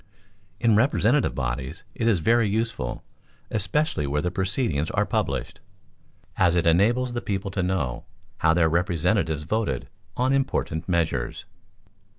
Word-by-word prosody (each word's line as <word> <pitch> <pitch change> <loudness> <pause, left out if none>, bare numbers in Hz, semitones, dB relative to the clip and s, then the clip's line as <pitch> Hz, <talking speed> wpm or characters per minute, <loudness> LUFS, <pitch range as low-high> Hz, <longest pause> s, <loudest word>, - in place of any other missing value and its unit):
In 115 -2 +4
representative 125 - +2
bodies 65 0 -3
it 115 - -1
is 100 -7 +3
very 115 +4 +3
useful, 110 - -2 0.5
especially 110 - 0
where 75 +2 -1
the 90 - -1
proceedings 95 - -1
are - - +1
published, - - -2 0.8
as 90 -2 +3
it 85 - +2
enables 115 +9 +3
the 120 - -2
people 100 -2 -3
to 95 - -1
know 90 -10 -2 0.3
how 80 0 +3
their 85 -1 +4
representatives 85 -1 +1
voted 105 - -2 0.3
on 130 +2 +2
important 130 - -1
measures. 80 -4 -1
95 Hz, 135 wpm, -25 LUFS, 80-115 Hz, 0.8 s, In